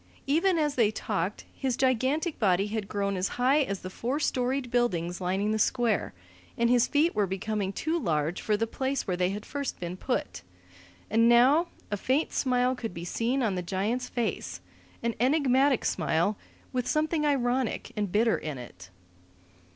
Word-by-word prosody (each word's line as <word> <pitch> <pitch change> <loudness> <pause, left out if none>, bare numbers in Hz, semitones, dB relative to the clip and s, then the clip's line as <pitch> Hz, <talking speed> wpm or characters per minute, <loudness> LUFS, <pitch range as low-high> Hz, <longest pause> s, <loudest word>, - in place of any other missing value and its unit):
Even 335 +6 +2
as 300 -2 +1
they 230 -6 +3
talked, 205 -3 -3
his 260 -3 -2
gigantic 265 +6 +1
body 195 -2 +3
had 210 -1 -3
grown 200 -1 -1
as 185 +1 0
high 265 +5 +4
as 200 -8 -2
the 185 - -6
four 255 +9 -2
storied 255 -2 -1
buildings 180 -8 0
lining 190 +4 0
the 220 - 0
Square, 220 - +1 0.4
and 235 0 +2
his 245 0 +4
feet 310 +4 +2
were 205 -2 +1
becoming 195 +1 -2
too 320 +10 -1
large 160 - -1
for 210 -1 +1
the 225 - +1
place 265 +3 -2
where 185 - -1
they 180 0 +1
had 205 +2 -5
first 280 -1 -4
been 175 0 -4
put. 95 - -3 0.7
And 230 +2 +5
now 265 +8 +5 0.2
a 205 - 0
faint 265 +9 0
smile 250 -1 +2
could 225 -6 -6
be 170 +1 -6
seen 245 +8 0
on 215 -4 +1
the 180 - -2
giant's 205 +8 -2
face, 235 -3 -3 0.4
an 235 0 0
enigmatic 265 0 +3
smile, 165 +4 +1 0.4
with 250 -1 -1
something 310 0 +1
ironic 260 -4 0
and 205 -3 -2
bitter 225 +3 +2
in 150 -3 -5
it. 90 -8 -11
230 Hz, 175 wpm, -28 LUFS, 195-265 Hz, 0.7 s, And